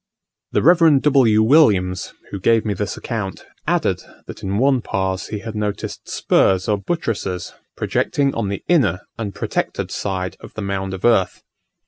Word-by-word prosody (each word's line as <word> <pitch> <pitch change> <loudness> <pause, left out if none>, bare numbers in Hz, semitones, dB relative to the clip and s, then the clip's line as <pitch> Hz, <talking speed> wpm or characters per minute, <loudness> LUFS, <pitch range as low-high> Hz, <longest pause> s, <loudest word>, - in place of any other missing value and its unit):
The - - +2
Rev. 165 -2 +6
W. 130 -7 +4
Williams, 100 - +3 0.2
who 100 - -4
gave 115 +4 +3
me 105 - 0
this 100 +2 -3
account, 105 -6 -5 0.2
added, - - +1 0.2
that - - -9
in 95 +1 -2
one 130 +1 +3
Pas 95 -2 -2
he 105 - -4
had 115 0 -6
noticed 105 -1 -4
spurs 95 -1 +2
or 105 -1 +1
buttresses 100 - -3 0.2
projecting 140 -1 0
on 115 -3 -2
the 100 - -4
inner 105 - +2 0.2
and 105 -3 -4
protected - - -2
side 95 -2 -3
of - - -13
the 110 - -4
mound 95 -1 -3
of 95 - -5
earth. 115 -6 +2
105 Hz, 160 wpm, -20 LUFS, 95-120 Hz, 0.2 s, Rev